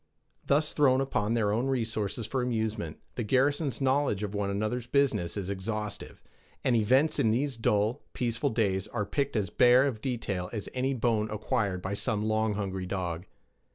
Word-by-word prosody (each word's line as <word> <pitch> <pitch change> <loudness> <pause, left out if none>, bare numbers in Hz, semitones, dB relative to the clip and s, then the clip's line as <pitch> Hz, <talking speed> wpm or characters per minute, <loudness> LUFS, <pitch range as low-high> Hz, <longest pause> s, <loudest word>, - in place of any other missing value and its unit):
Thus 150 +2 +2
thrown 135 -3 +4
upon 115 -5 0
their 105 -3 +2
own 120 +5 0
resources 115 -4 -1
for 130 +4 -1
amusement, 110 -8 -2 0.2
the - - -3
garrison's 135 +5 +1
knowledge 135 -6 +1
of 105 -1 -3
one 100 -1 -1
another's 110 +4 -2
business 125 -11 +1
is 100 -1 -3
exhaustive, 105 +2 -5 0.4
and 125 - +3
events 130 +8 +3
in 110 - +3
these 130 +4 0
dull, 110 0 +1
peaceful 120 +3 -1
days 100 -4 0
are 105 -4 -2
picked 140 +5 -1
as 100 -5 0
bare 125 +5 +6
of 120 -6 -2
detail 105 -8 -2
as 105 -4 -4
any 130 +1 0
bone 110 -3 +1
acquired 105 -3 -1
by 95 - -2
some 105 0 -1
long 110 -1 +1
hungry 95 -2 -3
dog. 90 -2 -3
110 Hz, 170 wpm, -29 LUFS, 100-130 Hz, 0.4 s, bare